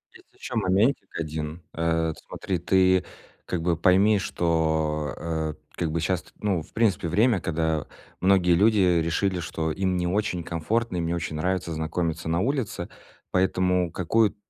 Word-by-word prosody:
Есть - - -19
ещё - - -7
моментик 100 +9 +2
один. 80 +1 -4
Э, 80 0 0
смотри, 95 - -3
ты 95 +1 +3 0.4
как 90 - -2
бы 85 0 +1
пойми, 95 +5 +4
что, 80 -4 0
э, 80 -2 -2 0.2
как 80 -3 -2
бы 85 - -1
щас 90 +2 0
ты, - - -20
ну, 100 -5 +1
в - - -21
принципе, 110 -6 +1
время, 105 +5 +3
когда 80 -3 -1 0.3
многие 90 -2 +4
люди 105 +4 +4 0.2
решили, 90 +3 0
что 80 -1 -2
им 95 +2 0
не 90 0 0
очень 95 -2 -1
комфортно, 90 +6 -1
им 85 - -1
не 85 - -1
очень 85 -2 -3
нравится 90 +2 -1
знакомиться 80 +1 -2
на 85 +1 +1
улице, 115 -7 -2 0.4
поэтому 90 -1 +2
какую 105 +5 +1
90 Hz, 155 wpm, -25 LUFS, 80-95 Hz, 0.4 s, пойми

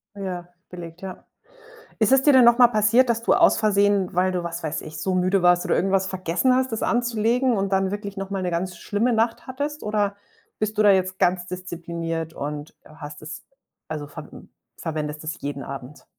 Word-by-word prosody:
Ja, 185 -3 -5 0.2
belegt, 175 -1 -9
ja. 190 -1 -8 0.8
Ist 220 0 +3
es 270 0 +5
dir 290 - +6
denn 255 -2 +7
noch 235 0 +6
mal 245 -1 +7
passiert, 230 +3 +3
dass 230 -1 +1
du - - +3
aus - - +5
Versehen, 200 -3 +2
weil 185 +1 +2
du, 180 -1 -2
was 170 0 -5
weiß 155 -2 -3
ich, 155 0 -9
so 190 - -1
müde 185 +1 +2
warst 175 0 +4
oder - - +1
irgendwas 190 0 +1
vergessen 190 +7 +1
hast, 260 -1 0
das 225 - -3
anzulegen 240 +1 +1
und 195 0 -1
dann 190 0 +1
wirklich 200 -1 -5
noch 195 0 -4
mal 195 -1 -3
'ne 180 - -1
ganz 175 +1 -3
schlimme 215 +7 0
Nacht 230 +1 0
hattest 285 +3 -4
oder 210 -1 0 0.4
bist 215 0 -2
du 215 - +4
da 205 - +6
jetzt 185 -1 +1
ganz 180 -1 +2
diszipliniert 170 -3 -5
und 145 0 -6
hast 150 -1 -10
es 155 +1 -8 0.5
also 150 -2 -5
verw - - -10 0.5
verwendest 150 -1 -4
es 160 +2 -5
jeden 140 -1 -4
Abend? 140 +1 -9
190 Hz, 200 wpm, -23 LUFS, 170-215 Hz, 0.8 s, denn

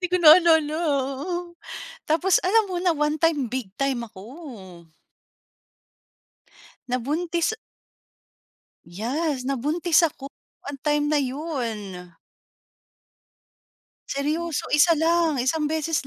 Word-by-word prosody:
Di 360 - 0
ko 365 - +2
naalala, 320 -1 +7
oo. 335 +4 -2 0.5
Tapos, 350 +4 +3
alam 435 +5 +3
mo 350 - -2
na 370 - +2
one-time 300 -1 +1
big 255 -5 -4
time 275 -3 0
ako! 200 - -12 2.0
Nabuntis. 320 - -1 1.3
Yas! 255 - -2
Nabuntis 305 +6 +2
ako 280 -3 -9 0.3
one 285 -1 -7
time 295 +1 0
na 300 - +3
yun. 240 - -4 2.0
Seryoso 305 +3 -2
isa 335 +3 +6
lang, 325 0 +2
isang 300 +4 0
beses 310 -2 -1
300 Hz, 95 wpm, -24 LUFS, 260-335 Hz, 2.0 s, naalala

